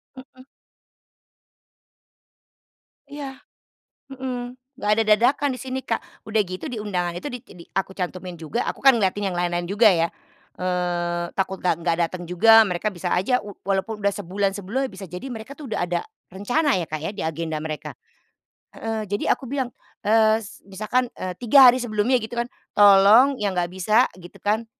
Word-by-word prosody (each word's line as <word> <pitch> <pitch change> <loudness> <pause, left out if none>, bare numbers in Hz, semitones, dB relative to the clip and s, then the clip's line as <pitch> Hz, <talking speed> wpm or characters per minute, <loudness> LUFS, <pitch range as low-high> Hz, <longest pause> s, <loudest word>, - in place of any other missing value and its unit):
Heeh. 260 0 -14 2.6
Iya, 280 -2 -8 0.7
mhm. 250 -2 -5 0.2
Nggak 210 - -3
ada 225 +1 +2
dadakan 245 +7 +3
di 255 - -7
sini, 260 0 -4
Kak. 230 - -1 0.2
Udah 220 0 +1
gitu 185 - -7
di 245 - -5
undangan 180 -4 -2
itu, 235 - -5
di 250 - -6
tidi 175 -2 -13
aku 190 0 -1
cantumin 180 -1 -5
juga, 165 +9 -3
aku - - -4
kan 270 0 +7
ngeliatin 200 -1 0
yang 180 - -4
lain-lain 175 0 -1
juga 215 +2 +5
ya, 170 -3 +2 0.5
eee, 175 -1 -1
takut 190 0 -1
nggak 180 -2 +2
nggak 170 -1 0
datang 175 +1 -7
juga, 225 +6 +7
mereka 185 +2 -1
bisa 180 0 -4
aja 220 +8 +2
u 205 - -9
walaupun 200 +2 -2
udah 200 0 +1
sebulan 200 0 -1
sebelumnya, 240 +8 -2
bisa 195 - -9
jadi 180 +6 -8
mereka 230 +2 -7
tuh 290 -5 -9
udah - - -1
ada 175 -1 -1 0.3
rencana 250 +10 +1
ya, 175 - -2
Kak, 155 - -3
ya, - - -2
di 205 - -6
agenda 160 0 -3
mereka. 155 -1 -5 0.8
Heeh, 220 -1 -4
jadi 205 +1 -2
aku 270 - -11
bilang, 260 -1 -2 0.3
eee, 220 +1 +3
s 205 0 -13
misalkan, 215 +6 -1
eee, 180 -1 -6
3 250 +3 +8
hari 245 - +3
sebelumnya, 240 +1 +1
gitu 220 -1 -6
kan, 240 - -6 0.2
"Tolong 205 +7 +7
yang 205 -4 -1
nggak 175 -1 -1
bisa," 210 +6 +2
gitu 175 -1 -14
kan, 215 +3 0
205 Hz, 175 wpm, -23 LUFS, 180-240 Hz, 2.6 s, 3